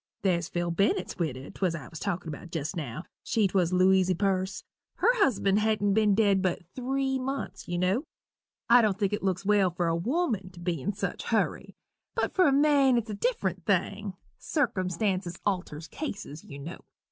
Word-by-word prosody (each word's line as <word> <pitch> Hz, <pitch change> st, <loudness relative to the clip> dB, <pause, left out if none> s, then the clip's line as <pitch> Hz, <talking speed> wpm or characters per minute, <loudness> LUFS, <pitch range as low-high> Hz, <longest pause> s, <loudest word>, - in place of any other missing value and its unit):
There's 175 Hz, -3 st, +1 dB
Phil 175 Hz, 0 st, -1 dB
Bennett's 185 Hz, +1 st, 0 dB
widder 135 Hz, -5 st, -3 dB
't -, -, -7 dB
I 135 Hz, -6 st, -9 dB
was 160 Hz, -, -9 dB
a -, -, -18 dB
talkin' 180 Hz, -4 st, -2 dB
about 155 Hz, +3 st, -8 dB
jest 165 Hz, +2 st, -3 dB
now 155 Hz, 0 st, -5 dB, 0.2 s
she 220 Hz, -3 st, +1 dB
't -, -, -12 dB
was 180 Hz, -2 st, +3 dB
Louisy 185 Hz, 0 st, +4 dB
Perce 190 Hz, +1 st, -1 dB, 0.3 s
her -, -, +3 dB
husband 205 Hz, -, +3 dB
hadent 210 Hz, -2 st, +2 dB
been 210 Hz, -1 st, +4 dB
dead 200 Hz, -3 st, +3 dB
but 185 Hz, -2 st, -1 dB
three 265 Hz, +1 st, -1 dB
months, 270 Hz, +2 st, -4 dB
you 175 Hz, -1 st, -2 dB
know. 190 Hz, -, +1 dB, 0.6 s
I 245 Hz, 0 st, +7 dB
don't 210 Hz, -4 st, +1 dB
think 200 Hz, -1 st, 0 dB
it 210 Hz, -, -1 dB
looks 190 Hz, 0 st, -1 dB
well 200 Hz, -2 st, +4 dB
for 175 Hz, 0 st, -2 dB
a 165 Hz, -, +1 dB
woman 225 Hz, -, -1 dB
to 175 Hz, -, -12 dB
be 175 Hz, -4 st, -2 dB
in 205 Hz, -, -1 dB
such 205 Hz, +1 st, -4 dB
a -, -, -8 dB
hurry -, -, -1 dB, 0.4 s
but 455 Hz, -, 0 dB
for 370 Hz, -3 st, +4 dB
a -, -, +4 dB
man 280 Hz, -2 st, +4 dB
it's 225 Hz, -2 st, -2 dB
a -, -, -3 dB
different 200 Hz, -5 st, -1 dB
thing 200 Hz, 0 st, 0 dB, 0.2 s
circumstances 185 Hz, -, -1 dB
alters 175 Hz, -5 st, -2 dB
cases, 200 Hz, -, -6 dB
you 140 Hz, -, -10 dB
know. 155 Hz, +6 st, -7 dB
195 Hz, 195 wpm, -28 LUFS, 175-220 Hz, 0.6 s, I